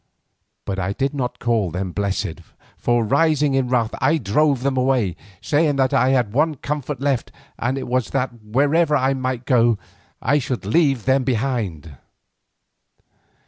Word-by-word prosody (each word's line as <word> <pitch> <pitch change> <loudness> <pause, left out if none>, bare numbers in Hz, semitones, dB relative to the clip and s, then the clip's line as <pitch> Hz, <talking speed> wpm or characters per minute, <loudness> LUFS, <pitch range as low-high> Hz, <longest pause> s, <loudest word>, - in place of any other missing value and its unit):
But 95 -1 -3
I 95 +1 -1
did 135 +5 -1
not 125 -3 -3
call 115 -6 0
them 90 +2 -4
blessed, 95 -3 -2 0.3
for, 120 -1 +1
rising 150 +3 +2
in 135 -1 +1
wrath, 120 -3 0
I 145 +5 +3
drove 135 +3 +1
them 140 -1 0
away, 125 -8 +1 0.3
saying 145 +6 +2
that 135 0 +1
I 130 -1 +3
had 125 -6 +2
but 120 - -4
one 155 +1 +2
comfort 145 0 -4
left, 135 -3 -1 0.3
and 125 +3 -1
it 135 - -5
was 125 -1 0
that 130 -1 -1
wherever 145 +8 +2
I 135 0 +1
might 130 -2 -3
go 120 -3 +3 0.4
I 145 +5 +2
should 125 -5 -4
leave 135 0 +2
them 130 0 +3
behind. 110 - -2
130 Hz, 160 wpm, -21 LUFS, 115-140 Hz, 0.4 s, I